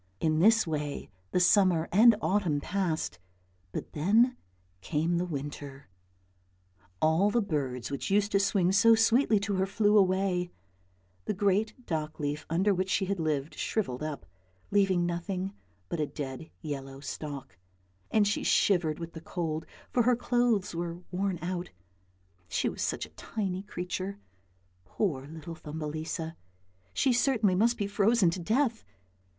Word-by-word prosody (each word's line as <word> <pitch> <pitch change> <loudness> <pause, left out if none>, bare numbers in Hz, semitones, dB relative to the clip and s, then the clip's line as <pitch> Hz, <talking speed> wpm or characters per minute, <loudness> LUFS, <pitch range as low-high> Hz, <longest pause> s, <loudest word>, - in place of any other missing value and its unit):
In 155 -1 +1
this 225 +5 +5
way 150 -3 -4 0.2
the - - +1
summer 180 -3 +4
and 225 +4 +7
autumn 180 -7 +1
passed, 165 - -2 0.5
but - - -6
then 220 - +3 0.5
came 165 - 0
the 180 - -1
winter. 140 - -6 1.1
All 160 +6 +3
the 235 - +2
birds 135 - -2
which 140 - -3
used 205 +1 +2
to 195 - +3
sing 195 -2 +2
so 225 +4 +6
sweetly 225 0 +4
to 200 -1 -1
her 190 +1 +1
flew 210 +1 +2
away, 185 -2 +1 0.8
the - - -1
great 205 +5 0
dock 155 -2 -3
leaf 145 +1 -3
under 190 +5 +2
which 185 0 -1
she 190 +1 +1
had 195 0 -2
lived 155 -2 -1
shrivelled 140 - -2
up, 150 - -4 0.5
leaving 195 -3 +3
nothing 180 +3 -3 0.3
but 170 - -3
a 150 - 0
dead 140 +2 -6
yellow 135 -3 -5
stalk, 140 -4 -7 0.5
and 210 -2 +3
she 210 - 0
shivered 170 -6 +3
with 170 0 -7
the 160 - -8
cold, 160 -2 -3 0.2
for 245 - +3
her 245 +1 +4
clothes 240 -5 +1
were 170 0 -3
worn 190 0 -1
out; 180 0 -3 0.8
she - - 0
was - - -4
such - - -1
a - - -16
tiny 190 -4 -4
creature, 190 0 -4 0.7
poor 135 - -2
little 160 +2 -8
Thumbelisa, 160 +1 -5 0.6
she 265 -3 +2
certainly 235 -5 +3
must 230 +6 +3
be 205 - -1
frozen 200 -1 +3
to 180 - -4
death. 225 +5 +1
180 Hz, 145 wpm, -29 LUFS, 155-205 Hz, 1.1 s, and